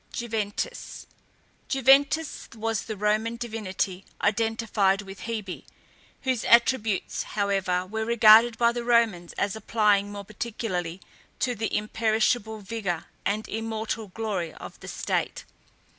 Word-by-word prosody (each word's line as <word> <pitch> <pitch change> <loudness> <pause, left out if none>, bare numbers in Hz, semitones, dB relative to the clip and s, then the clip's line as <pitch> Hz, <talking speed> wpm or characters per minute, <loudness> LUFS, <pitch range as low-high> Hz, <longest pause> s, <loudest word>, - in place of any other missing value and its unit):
JUVENTAS. 220 -3 -4 0.6
Juventas 280 +3 +3
was 225 0 -2
the 220 -2 -5
Roman 215 +3 +1
divinity 205 -5 -3 0.2
identified 215 -2 +1
with 195 +2 -9
Hebe, 215 -5 -4 0.6
whose 260 -4 0
attributes, 235 -4 +3 0.2
however, 195 -3 +1
were 220 +4 -3
regarded 230 0 +7
by 235 -1 +4
the 240 0 -4
Romans 230 -8 +2
as 200 +1 -1
applying 210 -2 +2
more 200 -1 -7
particularly 195 -5 -4 0.4
to 250 - 0
the 220 -1 -1
imperishable 220 +1 0
vigour 195 -5 -3 0.2
and 210 +2 -1
immortal 220 0 -3
glory 190 -5 -3
of - - -10
the - - -11
state. - - -2
220 Hz, 115 wpm, -26 LUFS, 200-230 Hz, 0.6 s, regarded